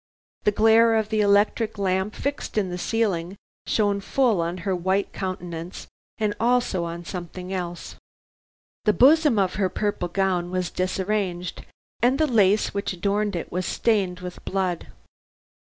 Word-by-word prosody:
The 210 - +5
glare 225 +2 +5
of 220 -1 0
the 215 -1 +1
electric 210 +2 +2
lamp 190 +1 0
fixed 280 -5 -4
in 195 -4 +1
the 180 - -4
ceiling, 190 -5 -1 0.3
shone 205 -2 +1
full 230 -4 +2
on 170 +2 -2
her 190 -2 +1
white 190 +3 0
countenance, 175 -2 -5 0.3
and 215 -2 0
also 235 -7 +1
on 170 +1 -6
something 180 +1 -6
else. 175 -2 -5 0.9
The 210 - +4
bosom 295 0 +5
of 190 -2 +2
her 190 - +2
purple 205 -1 -2
gown 180 -1 0
was 185 -1 -2
disarranged, 185 -1 -2 0.3
and 250 +3 +3
the 310 - +3
lace 210 -6 +3
which 200 -1 -2
adorned 200 +2 -1
it 170 - -5
was 180 0 -2
stained 190 -5 0
with 180 0 -8
blood. 185 -3 -2
195 Hz, 150 wpm, -24 LUFS, 180-215 Hz, 0.9 s, The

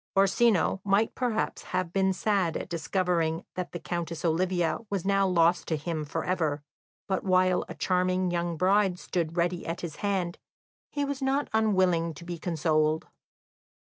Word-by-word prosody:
Orsino 195 -1 +3
might 200 +2 +2
perhaps 240 -4 -1 0.2
have 180 -2 -2
been 190 -1 +3
sad 190 -3 0
at - - -6
discovering 170 -1 0
that 180 -1 -4
the - - -4
Countess 170 -1 -4
Olivia 175 0 +1
was 195 -3 -2
now 195 0 +3
lost 170 -1 +3
to 160 - 0
him 155 0 -3
for 145 - -3
ever, 155 -5 0 0.4
but 190 -2 -1
while 185 -1 +3
a - - -6
charming 185 0 +1
young 170 -1 -1
bride 190 +1 +3
stood 170 -2 -3
ready 175 0 0
at 165 +1 -3
his 165 -3 -6
hand, 190 -4 -1 0.5
he 285 -1 -1
was 280 -1 -4
not 270 +2 0
unwilling 185 -7 +2
to 170 - -11
be 175 -1 -5
consoled. 155 -2 0
180 Hz, 160 wpm, -28 LUFS, 165-195 Hz, 0.5 s, Orsino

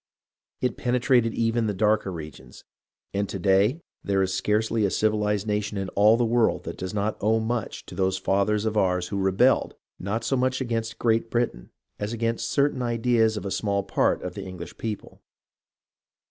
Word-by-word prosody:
It 125 -1 -1
penetrated 125 -2 +2
even 115 0 +1
the 105 - -1
darker 105 0 +2
regions, 75 -7 -10 0.5
and 100 0 -1
to - - -4
day 100 - +2 0.2
there 95 -1 +1
is 95 0 -1
scarcely 105 +3 +1
a 100 - +3
civilized 105 0 +1
nation 105 -1 -2
in 95 -1 -3
all 105 +3 +4
the 120 - +2
world 115 0 +2
that - - -6
does 95 - -4
not 105 0 -1
owe 110 +2 +3
much 115 0 -3
to - - -11
those 95 0 0
fathers 100 +3 +1
of 110 0 -1
ours 90 -3 +1
who 100 - -2
rebelled, 95 0 +2 0.2
not 100 +5 -2
so 135 - 0
much 130 0 +1
against 115 -3 -2
Great 115 -1 +1
Britain, 120 - -2 0.3
as 105 +2 -3
against 115 0 -1
certain 140 -2 +1
ideas 115 -2 +2
of 105 - -5
a 100 - -3
small 100 -1 0
part 100 - +1
of 90 - -4
the 100 - -6
English 90 -3 -8
people. 110 -2 -6
105 Hz, 180 wpm, -25 LUFS, 100-115 Hz, 0.5 s, all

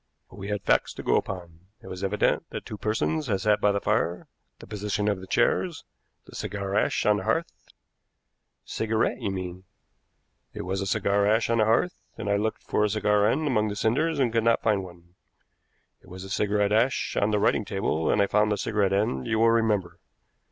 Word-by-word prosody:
But 95 - -14
we 100 - -6
had 105 -2 -3
facts - - +1
to - - -7
go - - +2
upon. 85 -3 -3 0.2
It 120 - -18
was 95 +1 -7
evident 100 +2 0
that - - -7
two - - -6
persons 140 +8 -1
had 100 -4 0
sat 105 0 +2
by 105 - +4
the 100 - 0
fire, 85 -3 -1 0.3
the - - -12
position 105 0 -2
of 100 -2 0
the 95 - -10
chairs, - - 0 0.4
the - - -15
cigar 100 0 -4
ash 105 - +1
on 105 0 +4
the 95 - -4
hearth 165 - 0 0.6
" - - -53
"Cigarette, 110 0 0
you - - -1
mean." 95 -1 -5 0.9
"It - - -5
was 95 +2 -2
a 100 - -3
cigar 100 0 +1
ash 110 +2 +2
on 115 - +2
the 110 - +4
hearth, 115 +11 +1 0.2
and 100 -2 -3
I - - +3
looked 110 +2 -2
for 105 - 0
a 105 - +2
cigar 105 0 +2
end 155 +8 +1
among 110 -7 +1
the 105 - -4
cinders 140 +11 +1
and 125 -4 +1
could 115 -1 +2
not 115 0 +2
find 105 -3 +1
one. 85 -1 -14 0.9
It - - -21
was 95 +1 -7
cigarette 105 -1 +1
ash 120 +5 +1
on 100 - +2
the 105 - +1
writing 105 +1 +2
table, 95 -5 -1
and 105 - +3
I - - +3
found 105 +1 +2
the 105 - +1
cigarette 100 -2 0
end, 95 -11 0
you 110 - 0
will 115 +1 +4
remember. 105 -7 0
105 Hz, 215 wpm, -26 LUFS, 95-110 Hz, 0.9 s, by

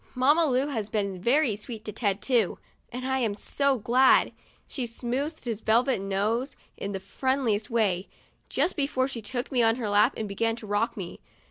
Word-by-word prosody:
Mamma 290 +6 +4
Lu 260 0 +2
has 225 -8 -3
been 200 -4 -2
very 245 +1 +3
sweet 220 +1 -8
to 210 - -4
Ted, 205 -2 -1
too; 235 -8 +2 0.3
and 255 +2 -4
I'm 255 -6 0
so 280 +5 0
glad. 250 +4 +4 0.4
She 255 -4 -3
smoothed 260 +7 -3
his 225 -3 -3
velvet 235 +1 +2
nose 210 +7 -1 0.2
in 200 - -5
the 195 - -3
friendliest 225 +1 -1
way, 205 -6 +1 0.4
just - - +1
before 275 -4 0
she 255 -4 -6
took 245 +5 -4
me 250 -3 +2
on 225 0 +4
her 235 -4 -3
lap 205 +1 +4
and 220 - -3
began 225 +3 0
to 230 - -10
rock 205 +3 -1
me. 180 -3 -6
230 Hz, 185 wpm, -27 LUFS, 205-260 Hz, 0.4 s, Mamma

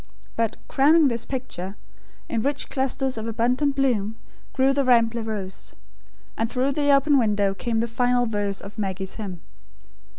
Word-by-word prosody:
But 230 -1 0
crowning 295 +2 +5
this 235 -1 -3
picture, 210 -7 -5 0.5
in 230 - -1
rich 280 +3 -1
clusters 265 -2 -1
of 220 - -5
abundant 250 +5 +1
bloom, 225 -6 +1 0.4
grew 265 +1 +3
the 280 0 +1
rambler 235 -2 +3
rose. 205 -4 -5 0.6
And 225 0 -1
through 260 +3 0
the 285 +1 0
open 280 0 +5
window 205 -4 +2
came 225 +3 -1
the 235 - -1
final 245 +1 +1
verse 205 -3 -2
of 200 +2 -10
Maggie's 190 -1 -3
hymn. 190 -6 -6
235 Hz, 155 wpm, -24 LUFS, 210-270 Hz, 0.6 s, crowning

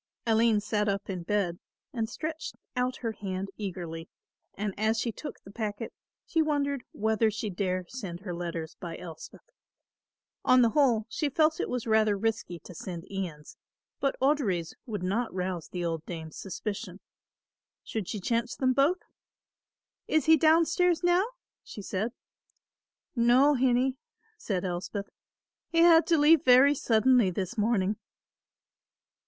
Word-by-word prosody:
Aline 225 -1 +3
sat 210 0 0
up 200 0 -2
in 185 -2 -4
bed 175 -2 -1 0.3
and 225 -3 -2
stretched 315 +5 -5 0.2
out 250 0 0
her 225 - +1
hand 195 -2 -4
eagerly 175 -5 -6 0.5
and 205 -1 -2
as 220 +2 +1
she 230 - -1
took 295 - -8
the 195 - -12
packet 215 0 -4 0.3
she 325 - +1
wondered 285 -3 0
whether 220 +1 +1
she 215 0 -4
dare 185 0 -1
send 195 -8 -7
her 185 -3 -5
letters 170 -2 -4
by 170 -2 -6
Elspeth. 165 -3 -10 1.0
On 255 0 +6
the 230 - +4
whole 240 -5 +3
she 290 +6 -1
felt 310 +3 +2
it - - -1
was 250 -2 -2
rather 220 -2 +3
risky 215 -4 -2
to - - -10
send 175 +1 -7
Ian's, 175 -6 -6 0.4
but 275 - 0
Audry's 245 - +1
would 210 -5 -4
not 225 +6 0
rouse 180 -3 -3
the 175 -1 -3
old 165 -2 -2
dame's 160 -3 -7
suspicion. 200 0 -5 0.8
Should 215 -5 -4
she 210 - -3
chance 230 +4 -1
them 255 -1 +2
both? 290 +8 +2 1.0
"Is 315 - +2
he 320 - +7
downstairs 330 +3 +3
now?" 350 +4 +3 0.4
she 205 - -9
said. 200 +5 -2 1.0
"No, 250 +5 +5
hinnie," 260 0 +2 0.4
said 195 - -3
Elspeth, 190 +3 -4 0.6
"he 335 - -3
had 335 -1 +7
to 330 - +4
leave 300 +1 +6
very 260 +3 +7
suddenly 240 -4 +3
this 185 +3 -3
morning." 210 -2 +1
220 Hz, 145 wpm, -29 LUFS, 185-260 Hz, 1.0 s, he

